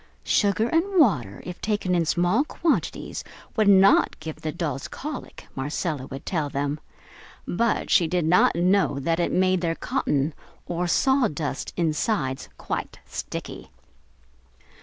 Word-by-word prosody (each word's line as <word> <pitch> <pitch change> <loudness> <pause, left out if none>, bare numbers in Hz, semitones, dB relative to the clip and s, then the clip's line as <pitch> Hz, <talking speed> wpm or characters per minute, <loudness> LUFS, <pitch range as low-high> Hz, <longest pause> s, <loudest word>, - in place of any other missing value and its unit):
Sugar 205 +2 +2
and 365 +3 +2
water, 125 - +2
if 180 -1 -7
taken 205 -4 0
in 170 -2 +2
small 175 - +2
quantities, 325 +1 -2 0.3
would 215 -2 +3
not 195 0 +5
give 160 -1 -6
the 155 - -2
dolls 150 -5 -3
colic, 295 -2 -7
Marcella 145 +1 -3
would 135 0 -8
tell 155 -5 -1
them, 145 +2 -2 0.7
but 230 +5 0
she 170 - +5
did 175 0 0
not 175 +1 +4
know 180 -3 +2
that 165 +5 0
it 170 - +1
made 185 -1 +2
their 165 -2 0
cotton, 145 0 -1 0.3
or 175 +1 -2
sawdust 175 - +1
insides, 155 -4 -1
quite - - -4
sticky. - - -6
175 Hz, 135 wpm, -25 LUFS, 150-200 Hz, 0.7 s, not